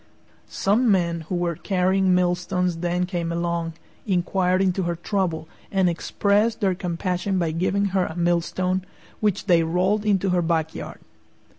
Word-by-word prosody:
Some 220 +5 +2
men 170 -4 +1
who 185 - -1
were 175 -1 -1
carrying 190 +1 +2
millstones 180 0 0
then 175 +1 0
came 175 -2 -3
along, 170 -1 -2 0.3
inquired 185 0 +1
into 190 0 +1
her 170 -1 -1
trouble, 170 -3 -2 0.2
and 190 -2 +2
expressed 205 +6 +1
their 195 -4 +2
compassion 180 +1 -2
by 170 -3 0
giving 190 +5 0
her 190 -2 +2
a 160 - -7
millstone, 175 +2 0 0.4
which 210 -3 0
they 175 -4 +4
rolled 180 +6 +1
into 195 -2 +1
her 180 -1 +2
back 160 -1 0
yard. - - -8
180 Hz, 150 wpm, -23 LUFS, 170-190 Hz, 0.4 s, they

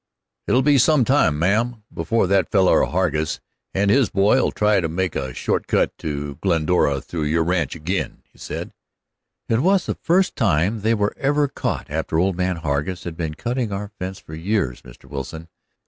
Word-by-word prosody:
"It'll 130 +1 +3
be 145 -1 +5
some 145 -1 +4
time, 130 - +3
ma'am, 110 +7 0
before 115 -3 +1
that 95 0 +2
feller 95 -3 +4
Hargus 80 -4 -1 0.3
and 100 +1 +1
his 135 -1 +4
boy'll 100 +7 +3
try 105 -1 +2
to 85 -3 -1
make 90 +1 -2
a 65 -1 -3
short - - -2
cut - - +1
to 70 -2 -4
Glendora 80 -5 +2
through 80 0 -4
your 80 +2 +2
ranch 85 0 0
ag'in," 85 +4 -3
said - - -6 0.8
he. - - 0
"It 115 - +3
was 190 +6 +3
the - - -1
first 185 +3 +1
time 100 - +1
they 110 +2 +2
were 105 -1 0
ever 145 +1 +2
caught, 135 - -4
after 80 +1 -1
old 95 +2 +2
man 90 0 0
Hargus 80 +2 -2
had 85 -2 -6
been 80 -2 -4
cutting 120 - -2
our 100 +1 -4
fence 95 +1 -4
for 80 - -13
years, 80 - -1
Mr. - - -15
Wilson. 75 +4 -7
95 Hz, 180 wpm, -22 LUFS, 80-115 Hz, 0.8 s, be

